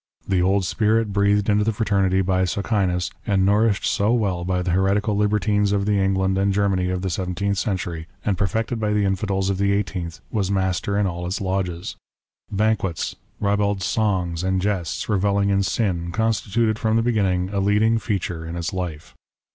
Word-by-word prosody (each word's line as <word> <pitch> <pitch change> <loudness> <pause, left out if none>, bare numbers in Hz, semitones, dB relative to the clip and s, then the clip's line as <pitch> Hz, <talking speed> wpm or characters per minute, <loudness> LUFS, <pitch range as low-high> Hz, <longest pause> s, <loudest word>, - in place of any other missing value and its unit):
The 95 -2 +2
old 95 +1 +2
spirit 110 +1 +1
breathed 100 0 +2
into 105 0 +3
the 115 - +1
fraternity 100 -3 +1
by 95 0 +1
Socinus, 95 -2 0 0.2
and 95 -2 +2
nourished 105 0 +2
so 105 +2 +1
well 100 -7 0
by 90 0 -1
the 90 - -1
heretical 100 +3 +1
libertines 105 0 +1
of 100 -1 +1
the 105 -1 +2
England 95 0 +1
and 100 0 +2
Germany 95 -2 +1
of 90 0 -2
the 95 - -1
seventeenth 95 +3 -1
century, 90 -6 -3 0.2
and 105 - +1
perfected 110 +5 -1
by 105 -1 0
the 105 -1 +2
Infidels 95 0 0
of 95 - -3
the 100 0 +2
eighteenth, 90 -4 -3
was 100 -4 0
master 95 0 0
in 105 - +2
all 90 -1 -3
its 90 - -2
lodges. 95 -3 -3 0.5
Banquets, 100 -5 0 0.2
ribald 100 -1 0
songs 95 -6 0
and 95 0 +1
jests, 95 -3 -2
revelling 100 -1 +1
in 100 0 +2
sin, 90 -5 -1
constituted 110 +1 0
from 110 0 +1
the 115 - +3
beginning, 95 -6 +1
a 100 - -1
leading 105 +3 +3
feature 90 -7 -3
in 80 +1 -6
its 85 +3 -3
life. 85 -5 -5
100 Hz, 180 wpm, -22 LUFS, 95-105 Hz, 0.5 s, into